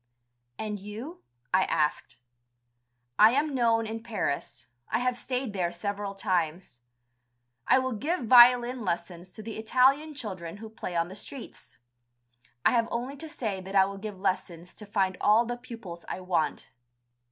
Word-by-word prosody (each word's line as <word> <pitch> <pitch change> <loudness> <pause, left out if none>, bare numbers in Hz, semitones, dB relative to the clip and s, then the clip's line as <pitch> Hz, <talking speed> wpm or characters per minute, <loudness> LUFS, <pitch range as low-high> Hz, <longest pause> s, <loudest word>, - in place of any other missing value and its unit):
"And 210 -1 -4
you?" 220 - -8 0.3
I 185 0 +4
asked. 150 -1 -1 1.0
"I 220 +2 +8
am 290 +2 +1
known 230 -3 +2
in 225 +1 -5
Paris, 220 -11 -3 0.2
I 220 - +1
have 250 +1 0
stayed 250 -2 -3
there 180 -3 -1
several 200 +3 -4
times. 175 -7 -2 0.9
I 260 - +6
will 260 0 0
give 295 - -1
violin 245 0 +6
lessons 175 0 -4
to 215 - -10
the 225 0 -6
Italian 270 +7 +3
children 185 - -6
who 220 +1 -9
play 185 -5 -6
on 170 0 +1
the 190 - -9
streets. 235 - -10 0.9
I - - +6
have 230 -2 +2
only 250 +4 -3
to 320 +3 -8
say 215 - -3
that 190 +1 -7
I 190 -1 +7
will 195 0 -6
give 205 -2 -7
lessons 180 -2 -2
to 210 - -10
find 190 -2 0
all 220 +3 +5
the 240 +1 -3
pupils 230 -9 -9
I - - -4
want. 175 -5 -1
215 Hz, 160 wpm, -28 LUFS, 185-245 Hz, 1.0 s, I